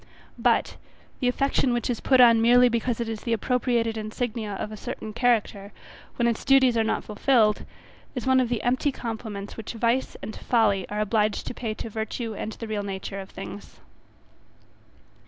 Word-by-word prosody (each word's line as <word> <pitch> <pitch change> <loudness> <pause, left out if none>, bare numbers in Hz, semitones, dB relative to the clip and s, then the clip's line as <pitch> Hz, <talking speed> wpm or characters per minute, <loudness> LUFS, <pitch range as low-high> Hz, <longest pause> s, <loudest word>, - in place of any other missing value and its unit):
But, - - +2 0.4
the 250 - 0
affection 265 0 +1
which 240 - -1
is 240 -3 -1
put 260 -1 +3
on 230 -2 +7
merely 245 +2 +6
because 235 0 -1
it 235 - -2
is 225 -1 -4
the 235 - -1
appropriated 235 0 0
insignia 215 0 -3
of 210 - -5
a - - -6
certain 215 +1 -6
character, 215 -4 0 0.4
when 235 - +1
its 230 -2 -1
duties 265 -3 +5
are 225 - +3
not 220 - -1
fulfilled 215 0 +2 0.5
is 250 - -4
one 260 0 +4
of 250 -2 +1
the 235 -3 -2
empty 255 +4 +1
compliments 220 -5 -6
which 225 - -6
vice 235 +3 0
and 220 - -6
folly 205 -6 +1
are 210 +1 -2
obliged 215 0 0
to - - -5
pay 225 -3 -4
to 230 - -6
virtue 220 +1 -4
and 215 +1 -5
the 230 - -7
real 215 -1 -2
nature 195 0 -5
of 190 0 -8
things. 100 -5 -9
230 Hz, 180 wpm, -25 LUFS, 215-245 Hz, 0.5 s, on